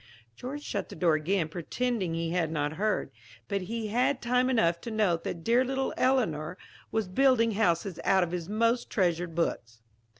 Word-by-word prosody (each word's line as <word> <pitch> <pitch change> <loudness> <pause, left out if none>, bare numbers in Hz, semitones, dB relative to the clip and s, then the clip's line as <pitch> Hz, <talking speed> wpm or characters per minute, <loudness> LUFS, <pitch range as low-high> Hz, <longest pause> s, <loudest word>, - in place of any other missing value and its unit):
George 280 - -6
shut - - -3
the - - -9
door 165 0 +3
again, 160 +3 +1
pretending 185 +3 -2
he 165 0 -2
had 170 -3 0
not 150 -1 -1
heard; 205 -5 -1 0.4
but 200 -1 -1
he 220 +3 -4
had 220 - -3 0.2
had - - -21
time 250 +1 +1
enough 170 -9 +2
to - - -6
note 205 -7 +1
that 165 -2 -5
dear 240 +5 +4
little 265 +1 -1
Eleanor 185 - +1 0.3
was 220 -3 0
building 240 +2 +3
houses 195 -3 0
out 190 -1 +4
of 170 - -3
his 175 0 -4
most 230 +3 +1
treasured 175 -3 0
books. 115 -9 -2
190 Hz, 185 wpm, -29 LUFS, 165-230 Hz, 0.4 s, dear